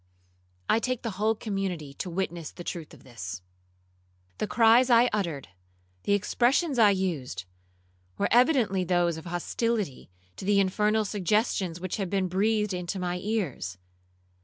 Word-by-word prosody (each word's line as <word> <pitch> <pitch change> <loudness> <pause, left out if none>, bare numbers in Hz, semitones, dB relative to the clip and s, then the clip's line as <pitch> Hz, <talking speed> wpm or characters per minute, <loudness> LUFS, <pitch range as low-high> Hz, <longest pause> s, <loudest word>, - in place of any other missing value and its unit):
I 225 - +3
take 255 0 -2
the 230 - -2
whole 220 +1 +3
community 190 -9 -3
to 180 - -5
witness 175 -3 -3
the 175 - -10
truth 170 -2 -6
of - - -15
this. 100 -7 -7 1.0
The - - -1
cries 230 +5 +5
I 240 +1 +5
uttered, 170 -10 -2 0.6
the 200 - +2
expressions 250 - +2
I 215 -2 +7
used, 170 - -2 0.7
were - - +1
evidently 240 -6 +4
those 175 -2 +1
of 160 - -9
hostility 190 - -2 0.3
to - - -7
the 200 0 +4
infernal 210 +3 +2
suggestions 195 -3 0
which 185 0 -3
had 195 -4 -2
been 195 -1 0
breathed 210 +2 +1
into 180 +1 -3
my 180 -1 -2
ears. 180 - -3
195 Hz, 145 wpm, -27 LUFS, 175-220 Hz, 1.0 s, I